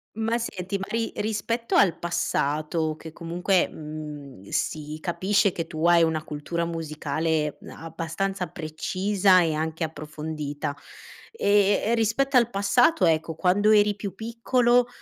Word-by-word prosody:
Ma 225 +2 0
senti, 195 -3 -4
ma 195 - -4
ri 230 0 -1
rispetto 225 +2 -2
al 185 -4 +4
passato, 155 -1 -1
che 160 0 -10
comunque, 175 +3 0
mhmm, 150 -8 -9
si 155 0 -2
capisce 195 +4 +1
che 165 -2 -4
tu 155 0 -3
hai 170 0 +6
una 160 -1 +1
cultura 160 +3 -3
musicale 155 -1 -2 0.2
abbastanza 165 +4 -3
precisa 185 +3 +2
e 160 -2 +1
anche 160 +2 -2
approfondita. 150 -1 -5 0.6
Ehm, 205 - +3
e - - +3
rispetto 235 +5 +1
al 240 -2 +5
passato, 200 - +3
ecco, 160 0 +1
quando 190 +5 +2
eri 210 -1 +5
più 200 -1 -6
piccolo 240 +2 +2
175 Hz, 130 wpm, -25 LUFS, 155-205 Hz, 0.6 s, hai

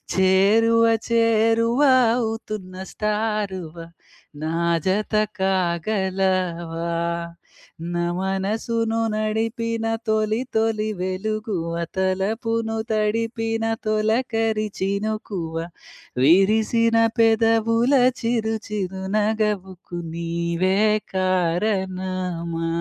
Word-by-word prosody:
చేరువ 205 +5 +4 0.3
చేరువ 230 +2 +3 0.3
అవుతున్న 220 -5 -4 0.2
స్టారు‌వ, 210 -5 -2 0.7
నా 160 +1 -2 0.3
జత 205 +4 0 0.3
కాగలవా 185 -2 0 1.1
నా 175 0 0
మనసును 220 +4 -1 0.2
నడిపిన 225 +1 -1 0.2
తొలి 215 0 +1 0.2
తొలి 220 -1 +1
వెలుగువ 185 -2 -3 0.2
తలపును 220 +4 -1 0.2
తడిపిన 225 +1 -1 0.2
తొలకరి 220 0 0
చినుకువ 200 -4 -3 0.7
విరిసిన 220 - +4 0.2
పెదవుల 225 +2 +3 0.3
చిరు 225 -2 0
చిరునగవుకు 195 -2 -2
నీవే 170 +2 -1 0.4
కారణమా 185 -2 -1
210 Hz, 60 wpm, -22 LUFS, 185-225 Hz, 1.1 s, చేరువ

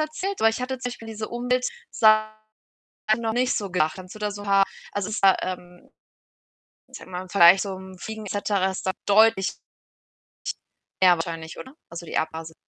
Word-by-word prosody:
erzählt, 340 +6 -2
aber 225 - +6
ich 225 - -2
hatte 255 0 -3
zum 250 -1 -4
Beispiel 230 -2 -10
diese 220 -1 -5
Umweltsachen 240 - +1 0.8
noch 225 -1 -2
nicht 250 +2 +1
so 200 -3 -4
gedacht. 155 -4 +1
Kannst 185 -1 -10
du - - -10
da 210 0 -1
so 205 0 -8
'n - - -10
paar 195 -1 +5 0.3
also, 205 0 -3
ist 215 - -4
da, 195 -1 +7
ähm, 180 -1 -7 1.0
ich - - -10
sage - - -13
mal 180 0 -4
im 185 - -12
Vergleich 185 -1 +7
zu 200 - -4
so 190 - -5
'nem 190 0 -11
Fliegen 220 +2 -7
et 195 - -4
cetera 200 -2 0
ist 190 - -6
da 190 - +2
deutlich 205 -1 +4 1.5
mehr 180 -1 +8
wahrscheinlich, 165 -1 -6
oder? 260 - -10
Also, 170 0 -8
die - - -6
Abgase. 160 0 -4
205 Hz, 200 wpm, -24 LUFS, 185-225 Hz, 1.5 s, mehr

